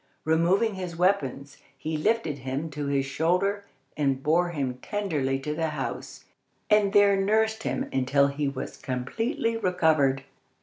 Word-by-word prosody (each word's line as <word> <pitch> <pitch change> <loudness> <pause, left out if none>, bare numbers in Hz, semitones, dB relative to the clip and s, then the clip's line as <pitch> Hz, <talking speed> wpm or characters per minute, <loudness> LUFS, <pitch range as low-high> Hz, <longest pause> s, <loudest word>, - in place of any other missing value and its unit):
Removing 175 +8 +2
his 180 -3 -5
weapons, 145 -7 0 0.2
he 160 0 -3
lifted 160 -3 0
him 135 +5 -4
to 145 0 -4
his 140 -1 +1
shoulder, 180 +8 0 0.3
and 135 -2 0
bore 175 +3 +2
him 135 -6 -3
tenderly 155 -11 -1
to 150 +3 -4
the 160 +1 -1
house, 150 -3 -5 0.5
and 210 -2 +4
there 205 0 +5
nursed 220 +3 +1
him - - -2
until 135 +2 +3
he 140 +1 -1
was 135 -1 -5
completely 225 - -2
recovered. 155 -9 +2
160 Hz, 140 wpm, -26 LUFS, 140-200 Hz, 0.5 s, there